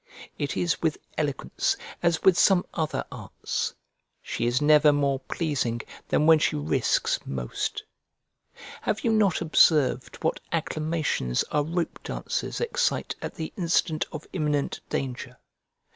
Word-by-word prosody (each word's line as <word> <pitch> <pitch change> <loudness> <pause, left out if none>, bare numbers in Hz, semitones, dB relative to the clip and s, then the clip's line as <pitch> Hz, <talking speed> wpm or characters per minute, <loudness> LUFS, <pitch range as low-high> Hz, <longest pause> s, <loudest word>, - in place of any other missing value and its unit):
It 145 - -2
is 170 -2 0
with 160 -2 +1 0.2
eloquence 145 -3 -1 0.2
as 170 -2 +1
with 190 - +6
some 185 0 +4
other 160 -2 -2
arts; - - -4 0.4
she 120 - -2
is 120 +2 +2
never 150 0 +6
more 140 -2 +1
pleasing 130 -6 -2 0.3
than 150 - +2
when 160 -1 +7
she - - +1
risks 75 +1 +1
most. 60 -2 -3 1.0
Have 215 - -1
you 230 - +2
not 210 -5 +3
observed 150 -5 +3
what 160 - +1
acclamations 155 - -1
our 150 - +2
rope 170 +3 -2
dancers - - -3
excite 485 +1 0
at - - -5
the 160 - -5
instant 170 -3 +1
of 155 -1 -7
imminent 150 -5 -1
danger? 125 -1 -4
155 Hz, 130 wpm, -26 LUFS, 135-170 Hz, 1.0 s, when